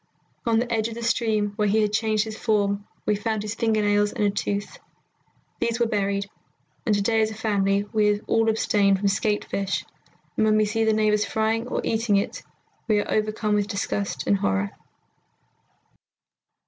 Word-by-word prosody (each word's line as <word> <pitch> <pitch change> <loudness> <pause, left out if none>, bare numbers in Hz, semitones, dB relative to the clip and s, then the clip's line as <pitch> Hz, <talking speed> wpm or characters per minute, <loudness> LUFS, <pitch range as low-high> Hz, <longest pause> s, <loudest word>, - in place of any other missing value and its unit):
"On 225 -1 +3
the 235 +1 0
edge 220 -1 +1
of 230 - -7
the 235 - -6
stream 220 -3 +1
where 210 -1 +2
he 210 +2 +3
had 210 0 -1
changed 215 -1 +1
his 220 -1 -6
form 205 -2 0 0.2
we 210 - +2
found 215 0 -2
his 210 0 -3
finger 225 -2 +1
nails 205 0 +2
and - - -2
a 205 - +3
tooth. 200 0 -3 0.8
These 235 0 -1
we 235 - +3
buried, 200 -2 -1 0.6
and 215 - +4
to 200 - 0
day 225 +1 +2
as 215 - +2
a 220 - -7
family 200 -2 +1
we 210 -1 +3
all 225 0 +1
abstain 205 -3 +2
from 200 +1 +1
skate 205 +1 0
fish, 195 -1 -2 0.5
and 220 - +3
when 215 0 +4
we 215 - +3
see 225 +2 0
the 220 - +4
neighbours 210 -1 +2
frying 220 +2 0
or - - -2
eating 225 -2 +1
it 200 - -1 0.5
we 215 -2 +3
are - - -3
overcome 215 0 0
with 205 -1 +1
disgust 200 -1 -3
and 200 - +3
horror." 95 - 0
210 Hz, 185 wpm, -24 LUFS, 205-220 Hz, 0.8 s, and